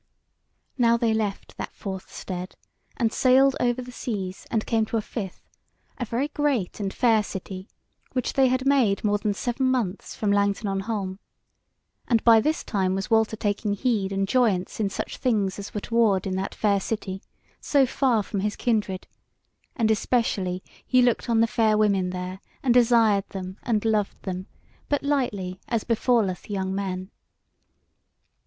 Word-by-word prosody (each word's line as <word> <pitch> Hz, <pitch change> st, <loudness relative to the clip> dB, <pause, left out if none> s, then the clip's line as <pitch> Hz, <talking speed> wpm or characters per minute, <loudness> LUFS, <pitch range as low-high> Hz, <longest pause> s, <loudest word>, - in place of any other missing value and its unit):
Now 235 Hz, -1 st, +5 dB
they 230 Hz, -1 st, +1 dB
left 210 Hz, -3 st, -3 dB
that -, -, -6 dB
fourth 190 Hz, -2 st, -6 dB
stead, 185 Hz, 0 st, -6 dB, 0.4 s
and 225 Hz, -2 st, +1 dB
sailed 265 Hz, +1 st, +5 dB
over 245 Hz, +1 st, +1 dB
the 250 Hz, -, -10 dB
seas 195 Hz, -7 st, -5 dB
and 220 Hz, -2 st, 0 dB
came 225 Hz, -2 st, +2 dB
to 230 Hz, -, -1 dB
a -, -, 0 dB
fifth, 195 Hz, -6 st, -6 dB, 0.5 s
a 245 Hz, -, -1 dB
very 245 Hz, +6 st, -1 dB
great 285 Hz, -12 st, -1 dB
and 200 Hz, -2 st, -2 dB
fair 225 Hz, -2 st, +3 dB
city, 190 Hz, -1 st, -7 dB, 0.4 s
which 255 Hz, -2 st, -1 dB
they 270 Hz, -1 st, +4 dB
had 255 Hz, +1 st, 0 dB
made 255 Hz, -8 st, +3 dB
more 205 Hz, -1 st, +2 dB
than 205 Hz, -1 st, -1 dB
seven 245 Hz, +4 st, -1 dB
months 225 Hz, -7 st, -2 dB
from 210 Hz, -2 st, 0 dB
Langton 200 Hz, +1 st, +1 dB
on 195 Hz, 0 st, -1 dB
Holm; 195 Hz, -2 st, -3 dB, 0.9 s
and 230 Hz, -3 st, +2 dB
by 225 Hz, -2 st, +7 dB
this 310 Hz, +6 st, 0 dB
time 190 Hz, -3 st, 0 dB
was 195 Hz, +2 st, -4 dB
Walter 220 Hz, -1 st, +3 dB
taking 205 Hz, 0 st, -1 dB
heed 205 Hz, -4 st, 0 dB
and 195 Hz, 0 st, 0 dB
joyance 215 Hz, -7 st, +1 dB
in 205 Hz, -2 st, +1 dB
such -, -, -5 dB
things 210 Hz, -7 st, 0 dB
as 200 Hz, -, -7 dB
were 210 Hz, -, -4 dB
toward 220 Hz, -5 st, +2 dB
in 190 Hz, -1 st, -2 dB
that 190 Hz, +1 st, -3 dB
fair 205 Hz, -2 st, +2 dB
city, 195 Hz, -2 st, -4 dB, 0.4 s
so 280 Hz, -2 st, +3 dB
far 250 Hz, -4 st, +1 dB
from 200 Hz, 0 st, -4 dB
his 210 Hz, +2 st, -1 dB
kindred, 210 Hz, -5 st, -1 dB, 0.7 s
and 225 Hz, -3 st, +2 dB
especially 200 Hz, -5 st, 0 dB, 0.2 s
he 255 Hz, -1 st, +4 dB
looked 245 Hz, 0 st, +1 dB
on 225 Hz, -1 st, +4 dB
the -, -, +6 dB
fair 220 Hz, -1 st, +2 dB
women 200 Hz, -4 st, +2 dB
there, 180 Hz, +1 st, -5 dB, 0.2 s
and 250 Hz, -3 st, +4 dB
desired 230 Hz, -4 st, +4 dB
them, 190 Hz, 0 st, -7 dB
and 225 Hz, -3 st, 0 dB
loved 215 Hz, -2 st, 0 dB
them; 185 Hz, 0 st, -4 dB, 0.4 s
but 290 Hz, -, 0 dB
lightly, 205 Hz, -11 st, -1 dB
as 230 Hz, -3 st, 0 dB
befalleth 230 Hz, -6 st, +1 dB
young 190 Hz, -2 st, -2 dB
men. 190 Hz, -1 st, -3 dB
215 Hz, 170 wpm, -25 LUFS, 195-240 Hz, 0.9 s, by